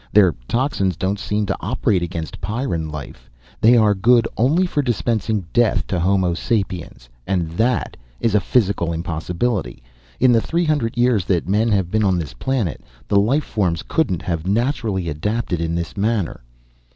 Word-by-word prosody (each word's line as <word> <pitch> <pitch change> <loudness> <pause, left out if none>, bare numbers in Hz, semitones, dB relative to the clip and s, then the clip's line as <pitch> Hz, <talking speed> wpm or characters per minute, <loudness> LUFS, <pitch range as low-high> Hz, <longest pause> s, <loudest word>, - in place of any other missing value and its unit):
Their 95 -5 +5
toxins 115 - 0
don't 100 +1 -1
seem 105 +1 -1
to 100 - -2
operate 105 -2 0
against 80 -5 -5
Pyrran 100 - -2
life. 70 -5 -9 0.3
They 120 +2 +6
are 105 -2 +4
good 115 +4 +4
only 150 +11 +3
for 150 -5 0
dispensing 110 -5 -1
death 120 -2 +2
to 90 - -2
Homo 95 0 +2
sapiens. 90 - -3 0.2
And 85 -4 -1
that 115 +7 0 0.2
is 115 - +1
a 105 - +5
physical 100 -5 +1
impossibility. 85 - -2 0.4
In 130 0 +5
the 115 -2 +4
three 170 +7 0
hundred 145 -7 0
years 120 -6 +2
that 90 -3 0
men 105 +4 +2
have 95 -4 +1
been 110 0 +2
on 95 -3 +2
this 80 -7 -4
planet, 105 - -2 0.3
the 100 - +3
life 130 +9 +2
forms 90 -6 -1
couldn't 95 - 0
have 85 -1 -3
naturally 110 -4 0
adapted 90 +3 -2
in 85 0 -1
this 85 -1 -4
manner." 105 - -1
100 Hz, 165 wpm, -20 LUFS, 85-115 Hz, 0.4 s, They